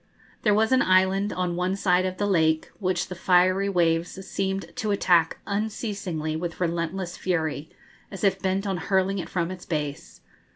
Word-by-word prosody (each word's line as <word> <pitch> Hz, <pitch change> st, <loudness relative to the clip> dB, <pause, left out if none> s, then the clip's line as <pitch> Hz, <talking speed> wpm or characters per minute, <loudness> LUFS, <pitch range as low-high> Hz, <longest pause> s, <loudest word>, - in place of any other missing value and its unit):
There 210 Hz, -2 st, +3 dB
was 220 Hz, +2 st, +2 dB
an 260 Hz, -, +5 dB
island 190 Hz, +2 st, +3 dB
on 180 Hz, -1 st, -2 dB
one 180 Hz, +2 st, 0 dB
side 185 Hz, -2 st, +2 dB
of 185 Hz, 0 st, -5 dB
the 205 Hz, -, 0 dB
lake, 160 Hz, -5 st, +2 dB
which 180 Hz, -3 st, 0 dB
the 185 Hz, -, -6 dB
fiery 185 Hz, +2 st, +3 dB
waves 175 Hz, +1 st, 0 dB
seemed 195 Hz, 0 st, -3 dB
to 215 Hz, -, -2 dB
attack 175 Hz, -5 st, +3 dB
unceasingly 200 Hz, -6 st, -3 dB
with 170 Hz, +1 st, -4 dB
relentless 170 Hz, +1 st, -2 dB
fury, 160 Hz, -4 st, -2 dB, 0.4 s
as 195 Hz, -3 st, -8 dB
if 190 Hz, -1 st, +2 dB
bent 190 Hz, +1 st, 0 dB
on 195 Hz, -2 st, -1 dB
hurling 190 Hz, +2 st, 0 dB
it -, -, -5 dB
from 175 Hz, -1 st, -1 dB
its 185 Hz, -1 st, -8 dB
base. 150 Hz, -3 st, -4 dB
185 Hz, 170 wpm, -25 LUFS, 170-195 Hz, 0.4 s, an